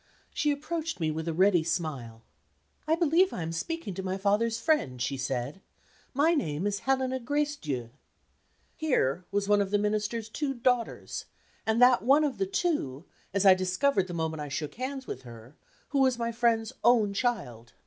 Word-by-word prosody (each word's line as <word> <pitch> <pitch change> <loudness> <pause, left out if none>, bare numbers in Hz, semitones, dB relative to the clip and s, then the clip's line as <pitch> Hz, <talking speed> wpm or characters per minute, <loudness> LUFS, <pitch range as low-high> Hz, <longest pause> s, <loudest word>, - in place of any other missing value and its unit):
She 300 - +1
approached 315 - -3
me 160 -2 0
with 160 +1 -4
a - - +1
ready 185 -2 +4
smile. 140 -10 -3 0.6
"I 320 - +4
believe 340 +3 +3
I 175 - -3
am 165 - -4
speaking 220 - -4
to 190 - -5
my 190 0 -2
father's 215 +4 +1
friend," 300 - +1
she 130 +3 -1
said; 130 +6 -3 0.5
"my 305 +5 +3
name 165 - -1
is 205 -1 0
Helena 260 0 0
Gracedieu." 235 - -2 0.8
Here 185 - 0
was 200 0 -1
one 205 0 +4
of 200 - -1
the 205 - +2
Minister's 210 +2 -1
two 270 +4 -3
"daughters"; 245 -1 -1 0.4
and 220 +1 +2
that 250 -4 +6
one 275 +7 +4
of 290 -3 -1
the 390 - +1
two 295 - -1 0.3
as 200 +1 0
I 190 - +9
discovered 185 +4 +1
the 175 - -6
moment 160 -2 -2
I 145 - -5
shook 145 +2 -4
hands 265 +2 -5
with - - -6
her 120 +2 -13 0.3
who 280 - 0
was 260 -2 +3
my 235 0 -1
friend's 230 -1 +1
own 220 -3 +4
child. 125 - -2
210 Hz, 180 wpm, -28 LUFS, 160-265 Hz, 0.8 s, I